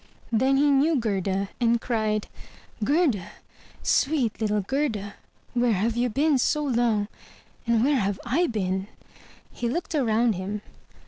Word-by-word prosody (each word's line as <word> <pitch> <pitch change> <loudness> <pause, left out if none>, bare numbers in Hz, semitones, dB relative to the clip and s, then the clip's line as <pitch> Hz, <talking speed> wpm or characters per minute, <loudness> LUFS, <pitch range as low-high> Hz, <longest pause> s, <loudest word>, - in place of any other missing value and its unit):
Then 260 +4 +3
he 290 +1 +4
knew 290 +4 +3
Gerda, 195 -5 -1
and 235 -1 +3
cried, 215 -3 -1 0.6
"Gerda, 275 - +1 0.5
sweet 270 -7 +1
little 210 -1 +1
Gerda! 215 -3 -2 0.4
where 240 -2 +2
have 220 +4 0
you 245 +1 +1
been 285 +4 +2
so 300 +4 +1
long? 235 -6 +1 0.6
And 230 -1 +3
where 280 0 +3
have 200 -2 -1
I 305 +9 +2
been?'* 190 -5 -2 0.6
He 240 - -3
looked 340 +7 -3
around 235 -5 +2
him. 200 +3 -5
235 Hz, 135 wpm, -25 LUFS, 210-270 Hz, 0.6 s, he